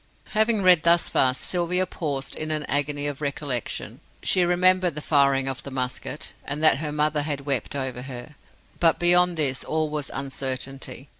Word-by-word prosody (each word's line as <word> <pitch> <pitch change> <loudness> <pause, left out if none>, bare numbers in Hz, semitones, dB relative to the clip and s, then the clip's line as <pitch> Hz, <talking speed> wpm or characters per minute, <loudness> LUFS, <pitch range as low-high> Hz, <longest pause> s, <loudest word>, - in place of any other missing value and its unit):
Having 215 -1 +2
read 180 -3 +6
thus 170 +1 +3
far, 130 -1 +2
Sylvia 180 +5 0
paused 145 -7 -4
in 155 - -4
an 155 -1 0
agony 145 0 -1
of 145 0 -4
recollection. 140 -4 -3 0.2
She 185 - +3
remembered 180 -1 +2
the - - -3
firing 140 -3 +2
of 135 -1 -3
the - - -8
musket, 130 -2 -4
and 145 +2 -4
that 155 -3 +6
her 150 -1 -3
mother 150 0 +1
had 145 -1 -2
wept 140 -2 -2
over 130 -3 -3
her. 125 +2 -8 0.5
But 165 -2 +5
beyond 175 0 +4
this 140 -4 +1
all 155 -1 -1
was 150 -2 -3
uncertainty. 135 0 -5
150 Hz, 170 wpm, -24 LUFS, 135-170 Hz, 0.5 s, read